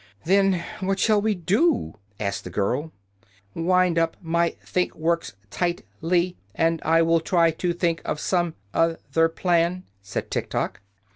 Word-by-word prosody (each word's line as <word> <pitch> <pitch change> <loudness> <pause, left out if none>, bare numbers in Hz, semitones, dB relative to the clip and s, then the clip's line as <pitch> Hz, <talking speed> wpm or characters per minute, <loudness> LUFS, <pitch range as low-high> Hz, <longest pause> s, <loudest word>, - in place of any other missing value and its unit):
"Then 195 -1 +3 0.2
what 195 0 0
shall 210 +1 +3
we 215 0 +1
do?" 230 - +1 0.3
asked 100 -1 -2
the - - -7
girl. 145 +10 -1 0.6
"Wind 180 0 +2
up 165 0 0
my 170 -1 0
think 180 -1 -1
works 170 +1 -1 0.2
tight 175 +4 -1 0.2
ly, 175 +1 +1 0.2
and 165 0 +1
I 165 +1 +4
will 165 0 +3
try 165 0 +3
to 175 +2 -1
think 170 -2 0
of 150 - -3
some 175 -2 0 0.2
oth 165 0 0
er 165 0 +5
plan," 175 +1 +1 0.2
said 100 - -5
Tiktok. - - -2
170 Hz, 150 wpm, -24 LUFS, 165-185 Hz, 0.6 s, er